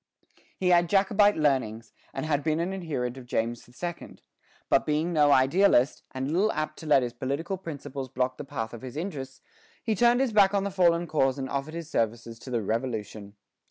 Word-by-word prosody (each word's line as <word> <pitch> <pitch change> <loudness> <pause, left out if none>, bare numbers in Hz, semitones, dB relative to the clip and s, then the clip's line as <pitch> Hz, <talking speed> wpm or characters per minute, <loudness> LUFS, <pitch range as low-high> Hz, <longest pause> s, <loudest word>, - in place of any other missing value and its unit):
He 185 - +1
had 175 -1 +4
Jacobite 205 +1 +4
leanings, 125 -7 0 0.2
and 135 - -4
had 145 -2 0
been 155 0 0
an 175 +3 -1
adherent 140 -9 -3
of 125 -2 -11
James 120 0 -2
II.; 175 -1 -5 0.5
but - - +3
being 155 +3 0
no 150 -2 +4
idealist, 140 0 +4
and 130 +2 -4
little 200 +6 +2
apt 155 0 -3
to 160 - -9
let 140 -3 +5
his 120 -1 -4
political 140 +9 -3
principles 145 -7 -7
block 130 +1 -1
the - - -6
path 115 -4 -5
of 120 - -8
his 130 +1 -8
interests, 140 -7 -5 0.4
he 225 - 0
turned 240 +3 +4
his 265 -4 +1
back 205 -1 +5
on 195 - +1
the 200 - -2
fallen 175 -2 +3
cause 135 -5 +1
and 130 -1 -5
offered 140 +3 -3
his 170 -2 -6
services 115 0 -2
to 130 - -10
the 120 -3 -1
Revolution. 110 -2 -4
145 Hz, 195 wpm, -27 LUFS, 125-175 Hz, 0.5 s, let